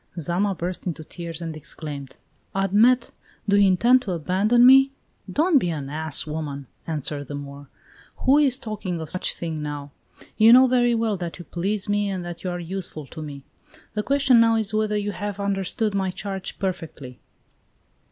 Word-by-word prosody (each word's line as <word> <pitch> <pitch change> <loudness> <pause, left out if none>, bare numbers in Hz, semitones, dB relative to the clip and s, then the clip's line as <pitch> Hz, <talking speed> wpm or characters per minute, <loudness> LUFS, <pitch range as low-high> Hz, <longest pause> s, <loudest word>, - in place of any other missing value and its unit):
Zama 185 +5 0
burst 180 +2 -4
into 165 -2 -4
tears 170 0 -7
and 165 -1 -5
exclaimed: 145 -3 -7 0.4
"Admet, 215 +6 +3 0.4
do 200 - +3
you 200 -1 +6
intend 240 +8 +4
to 195 -7 -3
abandon 195 +9 +3
me?" 270 +1 +7 0.4
"Don't 315 -1 +4
be 180 - -1
an 145 -4 -4
ass, 155 -1 -1
woman!" 150 -3 -5 0.2
answered 150 -2 -3
the 145 - -5
Moor. 140 0 -8 0.6
"Who 275 +3 +6
is 270 -4 +3
talking 205 -8 -4
of 160 -2 -6
such 185 - -1
a - - -21
thing 160 -2 -4
now? 145 -1 -5 0.5
You 225 +2 +8
know 255 +1 +8
very 240 -2 +3
well 225 -3 0
that 175 -2 -5
you 175 - -10
please 195 +3 -1
me 205 0 +1
and 185 -2 -4
that 175 -1 -7
you 185 - -2
are 175 0 -3
useful 175 -3 -5
to 155 +3 -9
me. 140 -2 -8 0.5
The 210 - -1
question 275 0 +4
now 230 0 +5
is 220 -1 -1
whether 215 -1 +1
you 205 0 -2
have 205 -1 -5
understood 200 +2 -1
my 190 -1 0
charge 190 0 -5
perfectly." 160 -9 -5
190 Hz, 180 wpm, -24 LUFS, 160-215 Hz, 0.6 s, You